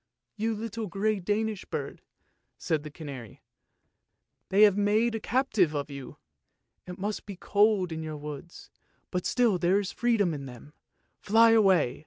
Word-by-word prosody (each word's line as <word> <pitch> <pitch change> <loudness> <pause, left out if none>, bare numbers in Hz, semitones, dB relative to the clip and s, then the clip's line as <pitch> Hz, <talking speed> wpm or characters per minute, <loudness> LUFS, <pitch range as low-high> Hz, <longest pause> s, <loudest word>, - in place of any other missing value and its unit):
" - - -60
" - - -55
You 225 0 +1
little 225 0 -5
grey 205 +3 -1
Danish 210 +2 -1
bird," - - -5 0.6
said 160 -4 -1
the 150 - -8
canary, 140 - -10 0.5
" - - -53
they 200 +2 +5
have 205 -3 +6
made 210 +3 +2
a 225 - -2
captive 220 - +1
of 145 0 -3
you 140 -2 -9 0.7
too! 180 - -6
It - - -11
must 205 +2 -4
be 200 - -6
cold 200 -1 +2
in 160 0 -4
your 155 -1 -5
woods, 150 +3 -9 0.4
but 180 -1 -2
still 235 -7 +2
there 180 +4 +3
is 200 -1 -4
freedom 225 -8 +1
in 140 -2 -6
them. 125 +4 -12 0.5
Fly 225 +2 +5
away! 190 - +3
195 Hz, 175 wpm, -28 LUFS, 155-215 Hz, 0.7 s, have